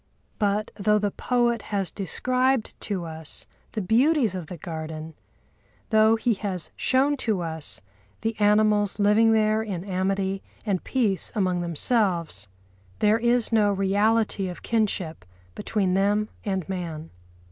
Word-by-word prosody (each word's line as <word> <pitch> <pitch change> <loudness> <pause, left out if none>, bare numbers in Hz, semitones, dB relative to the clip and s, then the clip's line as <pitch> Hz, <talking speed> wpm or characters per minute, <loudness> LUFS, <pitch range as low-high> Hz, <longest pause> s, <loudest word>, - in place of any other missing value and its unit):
But 210 0 0
though 210 +1 +3
the 205 -1 0
poet 240 -1 +1
has 195 -6 -3
described 255 - 0
to 190 -5 -3
us 160 -1 -7 0.3
the 215 - -2
beauties 240 - +3
of 180 -4 -5
the 180 - -7
garden, 160 0 -6 0.8
though 220 0 +5
he 230 +1 +1
has 190 -4 -3
shown 275 +3 +2
to 220 -7 0
us 160 -11 -1 0.4
the 225 0 -1
animals 210 -1 +3
living 210 +2 +4
there 215 0 +3
in 195 -6 -4
amity 195 0 -1 0.2
and 195 -4 -1
peace 220 -8 +1
among 185 -4 +1
themselves, 170 - 0 0.5
there 215 +2 +3
is 240 0 +2
no 210 -2 +4
reality 200 +1 +1
of 180 - -9
kinship 195 - -1 0.3
between 195 - -1
them 205 +2 +2
and 190 -4 -2
man. 170 -4 -5
205 Hz, 135 wpm, -25 LUFS, 180-220 Hz, 0.8 s, though